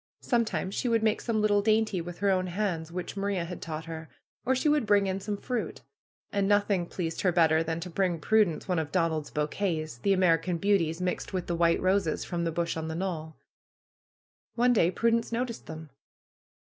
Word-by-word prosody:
Sometimes 230 -5 0
she 250 - -1
would 230 -1 +2
make 215 -1 +2
some 225 -3 0
little 205 -1 +3
dainty 215 -3 +2
with 175 +1 -7
her 200 0 +2
own 185 -1 +1
hands, 175 -4 -2
which 180 +2 -5
Maria 195 -3 -1
had 175 0 -7
taught 160 -1 -5
her; 160 -1 -7 0.4
or 260 - +3
she 260 - 0
woud 295 -6 +2
bring 205 -1 +4
in 190 0 -1
some 205 +1 -3
fruit. 245 +3 -4 0.5
And 200 -1 +1
nothing 200 -3 +2
pleased 165 -3 -3
her 185 - +3
better 160 -2 +4
than 165 0 -2
to 180 - -5
bring 180 -1 0
Prudence 210 -2 +2
one 180 -3 +1
of 150 -2 -4
Donald's 160 -4 0
bouquets," 155 -2 -2
the 195 +9 +2
Amer 180 -4 +4
ican 170 0 -3
Beauties 180 -4 +1
mixed 180 +1 -2
with 185 -2 -2
the 175 - -2
white 170 0 +3
roses 185 -3 +1
from 170 -1 -2
the 165 - 0
bush 170 +1 -1
on 160 -1 -4
the 160 - -4
knoll. 165 -3 -4 1.2
One 245 +1 +4
day 175 -7 +4
Prudence 230 +5 +1
noticed 235 0 -3
them. 160 -2 -8
185 Hz, 200 wpm, -28 LUFS, 165-205 Hz, 1.2 s, bring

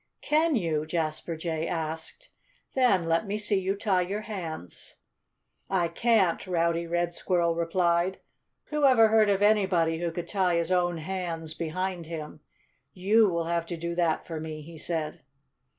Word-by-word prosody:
"Can 310 +1 +2
you?" 160 -7 -1
Jasper 160 0 -2
Jay 160 0 -2
asked. 160 - -5 0.4
"Then 245 -9 +3
let 165 +5 0
me 205 +1 -1
see 205 -2 +1
you 190 +1 -1
tie 200 -3 +1
your 195 +4 -3
hands." 170 - -7 0.7
"I 180 -3 +1
can't!" 195 -1 +2
Rowdy 170 -1 0
Red 175 0 -1
Squirrel 170 -2 +1
replied. 170 +2 +1 0.5
"Who 300 -1 -1
ever 240 -5 +6
heard 215 -1 +4
of 200 0 +2
anybody 185 -6 +3
who 170 0 -1
could 170 +1 -5
tie 185 -3 +1
his 170 +1 0
own 175 -1 +2
hands 165 -2 -4
behind 175 +1 -3
him?... 155 -2 -7 0.6
You 205 +3 +4
will 170 -2 -1
have 170 0 -1
to 170 - -4
do 170 +1 -3
that 170 -2 0
for 165 -3 -5
me," 155 -1 -6
he 165 +1 -11
said. 160 0 -3
175 Hz, 160 wpm, -27 LUFS, 165-195 Hz, 0.7 s, ever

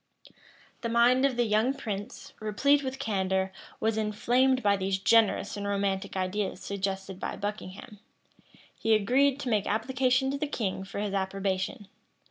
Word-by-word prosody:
[*] - - -27
The 230 - -2
mind 245 +3 +4
of 265 -3 0
the 240 - +3
young 220 +5 +2
prince, 205 -6 -6
replete 265 +7 +2
with 265 -1 -4
candor, 190 -6 0 0.3
was 220 0 0
inflamed 245 +5 +2
by 200 -1 +4
these 190 0 -1
generous 220 +2 +3
and 200 -1 -4
romantic 200 -1 -1
ideas 190 +1 -2
suggested 195 -1 -4
by - - -4
Buckingham. 205 0 -6 0.8
He 225 0 +2
agreed 260 +6 +3
to 255 - -3
make 210 -3 +1
application 255 +4 +1
to 280 - -3
the 300 - -1
king 200 -9 -2
for 195 - -8
his 205 -1 -2
approbation. 195 +2 -2
210 Hz, 155 wpm, -28 LUFS, 195-250 Hz, 0.8 s, mind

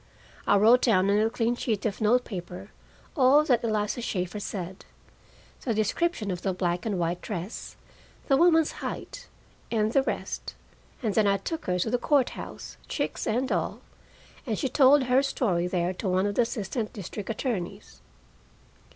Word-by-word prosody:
I 205 - +5
wrote 230 +5 +6
down 200 -4 +3
on 205 - +3
a 220 +1 +3
clean 230 +1 0
sheet 225 -4 -2
of 215 0 -2
note 245 +4 +3
paper 185 0 -7 0.4
all 280 +1 +6
that 245 -6 +2
Eliza 215 +1 -1
Shaeffer 185 -2 -3
said: 190 -2 -6 0.8
the 230 -4 -1
description 215 - 0
of 180 -1 -4
the 190 - -1
black 180 +2 -1
and 205 -3 -1
white 175 0 -1
dress, 195 0 -6 0.5
the 275 - +4
woman's 325 0 +4
height, - - -6 0.4
and 215 -1 +1
the 275 - +5
rest, 265 - -4 0.5
and 215 -3 0
then 215 -1 +3
I 200 0 +3
took 320 - -5
her 180 0 0
to 180 +5 -1
the 245 - +1
court 280 -3 +3
house, - - -8
chicks - - -3
and 250 +4 0
all, - - -1 0.7
and 220 -3 -1
she 270 - -1
told 275 +1 +5
her 255 +1 +3
story 190 -10 0
there 180 0 0
to 190 +1 -3
one 185 +1 +2
of 205 - 0
the 245 - +3
assistant 225 -1 -3
district 200 +1 -7
attorneys. 225 -6 -4
215 Hz, 170 wpm, -27 LUFS, 190-250 Hz, 0.8 s, wrote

